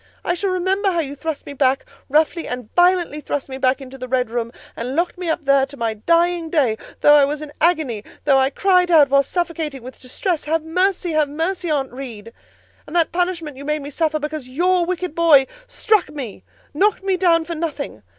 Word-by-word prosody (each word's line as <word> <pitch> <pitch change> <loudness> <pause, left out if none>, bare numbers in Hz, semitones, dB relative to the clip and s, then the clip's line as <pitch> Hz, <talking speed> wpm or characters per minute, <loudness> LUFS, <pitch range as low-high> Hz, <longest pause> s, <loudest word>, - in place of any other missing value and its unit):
I 350 - +1
shall 385 +3 -1
remember 375 +2 +1
how 345 -3 0
you 280 -2 -5
thrust 305 +1 -5
me 285 - -7
back—roughly 290 +4 0
and 250 -3 -6
violently 350 -4 +3
thrust 285 -2 -4
me 265 0 -6
back—into 265 0 -1
the 255 - -6
red 250 -2 0
room, 235 -1 -2 0.2
and 250 +3 -4
locked 340 +2 0
me 360 -2 -4
up 320 -1 -2
there, 275 0 +4
to 280 +1 -12
my 230 -2 -1
dying 335 +8 +1
day; 265 -10 +1 0.2
though 295 - +7
I 295 -1 +7
was 290 +2 -1
in 295 -1 -10
agony; 305 -11 +1 0.2
though 275 -2 +5
I 265 0 +3
cried 360 +3 +2
out, 305 -5 +6
while 275 0 +6
suffocating 320 -4 -3
with 255 +1 -10
distress, 315 +6 -3
'Have 320 +1 0
mercy! 365 +2 0
Have 305 -2 +1
mercy, 335 +4 -2
Aunt 275 -4 -1
Reed!' 230 -4 -8 0.5
And 305 - -8
that 335 -2 +2
punishment 340 -5 -2
you 280 - -8
made 300 0 -2
me 285 - -7
suffer 310 +1 0
because 300 -3 -5
your 350 +5 +1
wicked 365 -2 -3
boy 320 -5 +5 0.2
struck 430 -6 +1
me—knocked 300 - -3
me 390 -1 +1
down 335 -3 +3
for 340 - -4
nothing. 305 - -4
305 Hz, 200 wpm, -20 LUFS, 270-345 Hz, 0.5 s, though